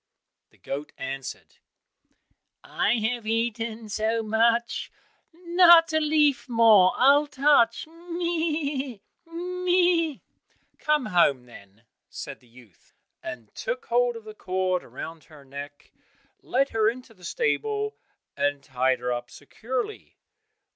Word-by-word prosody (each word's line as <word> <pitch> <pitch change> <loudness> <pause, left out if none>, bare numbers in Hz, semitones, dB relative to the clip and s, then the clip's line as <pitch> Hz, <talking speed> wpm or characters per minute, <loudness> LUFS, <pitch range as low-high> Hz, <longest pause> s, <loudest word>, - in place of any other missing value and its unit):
The - - -27
goat 145 +2 -6
answered, 135 -1 -7 1.1
"I 210 - 0
have 225 0 -2
eaten 225 0 -2
so 220 +2 -1
much, 230 +2 +1 0.4
Not 340 -1 +5
a 315 - +3
leaf 300 -4 +2
more 225 -6 +6
I'll 285 +3 +5
touch, 275 -5 +3
meh! 325 -6 -3 0.3
meh!" 355 -2 +1 0.6
"Come 300 -3 +1
home, 170 -10 +3
then," 105 -2 -16 0.3
said - - -8
the 125 - -24
youth, 115 -6 -21 0.3
and 115 -4 -8
took - - -4
hold 245 0 +1
of 230 - -9
the 215 0 -10
cord 185 -2 -1
round 165 -1 -9
her 150 -4 -16
neck, 140 +1 -10 0.5
led 275 +2 0
her 220 -1 +2
into 245 0 -9
the 185 -4 -22
stable 435 - -1 0.4
and 145 -1 -1
tied 130 -1 0
her 125 0 -1
up 120 0 -5
securely. 255 - -6
235 Hz, 120 wpm, -25 LUFS, -, 1.1 s, more